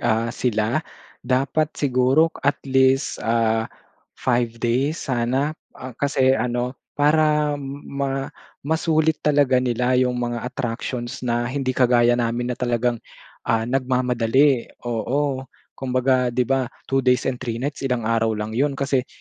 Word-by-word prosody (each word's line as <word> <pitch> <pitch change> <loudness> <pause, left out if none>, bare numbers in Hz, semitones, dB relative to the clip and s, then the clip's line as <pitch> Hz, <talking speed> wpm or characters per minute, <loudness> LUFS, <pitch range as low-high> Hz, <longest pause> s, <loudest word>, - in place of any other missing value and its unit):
ah, 115 +2 +1
sila 115 +2 0 0.5
dapat 135 +4 +1
siguro 135 +4 +3 0.2
at 140 - +3
least, 135 0 +2
ah, 115 0 +1 0.5
5 120 -2 +1
days 130 +7 +1
sana 130 +5 0 0.5
kasi 135 -2 +3
ano 125 +1 -1 0.2
para 150 0 +3 0.3
ma 135 -1 -2 0.4
masulit 160 0 +2
talaga 140 -4 +3
nila 125 +1 +1
yung 125 -1 +2
mga 120 -1 -2
attractions 120 0 -4
na 120 -1 0
hindi 130 0 -2
kagaya 120 -1 +4
namin 120 +1 -1
na - - -25
talagang, 120 -1 0 0.5
ah, 115 0 +2
nagmamadali, 125 0 +2 0.2
oo. 130 +4 -1 0.4
Kumbaga 130 -1 +1
'di 125 - +3
ba, 135 -1 +1 0.2
2 135 - +3
days 125 -1 +3
and 125 - -6
3 115 -2 -4
nights 140 -1 -3
ilang 125 -2 -1
araw 115 0 +1
lang 105 +1 -4
yun 135 +5 0
kasi 135 -2 0
125 Hz, 130 wpm, -22 LUFS, 120-135 Hz, 0.5 s, kagaya